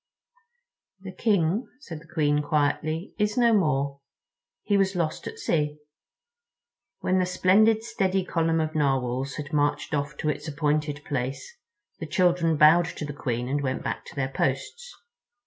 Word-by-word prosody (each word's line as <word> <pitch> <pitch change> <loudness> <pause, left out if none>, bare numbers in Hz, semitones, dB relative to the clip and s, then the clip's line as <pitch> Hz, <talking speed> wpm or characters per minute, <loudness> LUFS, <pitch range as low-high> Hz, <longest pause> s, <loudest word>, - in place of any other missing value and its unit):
"The 190 -1 -7
King," 200 +1 +1
said 165 - -8
the 165 +2 -19
Queen 150 -3 +2
quietly, 155 +4 -1
"is 210 +2 0
no 235 -2 +4
more. 140 -7 +1 0.6
He 205 - +1
was 195 -1 +2
lost 165 -3 -2
at 450 - -7
sea." 150 - -1 1.2
When 185 0 +1
the 185 - +2
splendid 215 +5 +3
steady 190 -4 0
column 165 -2 +1
of 155 0 -1
Narwhals 135 -2 0
had 150 -1 -7
marched 145 +1 0
off 145 0 -2
to 155 - -1
its 150 +1 -3
appointed 150 -1 -1
place 135 - -4 0.4
the 160 - -5
children 170 -1 +2
bowed 160 +3 +6
to 155 - -6
the 145 - -6
Queen 125 -4 -3
and 140 +2 -1
went 130 -2 -2
back - - -3
to - - -12
their 135 -2 -1
posts. 135 - -2
155 Hz, 155 wpm, -26 LUFS, 145-185 Hz, 1.2 s, bowed